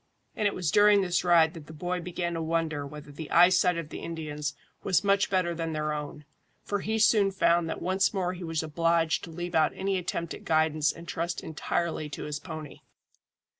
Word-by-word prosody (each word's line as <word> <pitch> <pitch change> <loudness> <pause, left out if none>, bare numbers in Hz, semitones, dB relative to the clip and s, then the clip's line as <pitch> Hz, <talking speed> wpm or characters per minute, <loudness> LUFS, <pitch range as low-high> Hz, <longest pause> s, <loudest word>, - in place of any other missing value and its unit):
And 210 - +1
it 200 - -2
was 170 -5 -1
during 205 +1 +6
this 180 -2 0
ride 170 -2 +5
that 160 -4 -11
the 160 - -10
boy 180 +3 -3
began 175 0 -3
to 165 - -3
wonder 160 -3 -1
whether 150 0 -10
the 150 +2 -8
eyesight 180 0 +5
of 165 -3 -5
the - - -7
Indians 150 -3 -4 0.3
was 190 0 +2
much 200 0 +2
better 185 -3 +1
than 165 -1 -3
their 150 0 -1
own, 150 0 -6 0.4
for 205 - -2
he 220 +3 -1
soon 215 -2 +4
found 170 -3 +2
that - - -4
once 190 +2 +2
more 185 -3 -1
he 180 0 -8
was 165 -1 -2
obliged 165 +1 +1
to - - -11
leave 175 +2 -6
out 155 -1 +3
any 190 0 -1
attempt 170 -1 -3
at - - -10
guidance 155 -1 +2
and 170 0 -12
trust 170 0 -3
entirely 160 0 -2
to - - -6
his 150 -1 -4
pony. 155 -4 -8
170 Hz, 205 wpm, -28 LUFS, 155-180 Hz, 0.4 s, during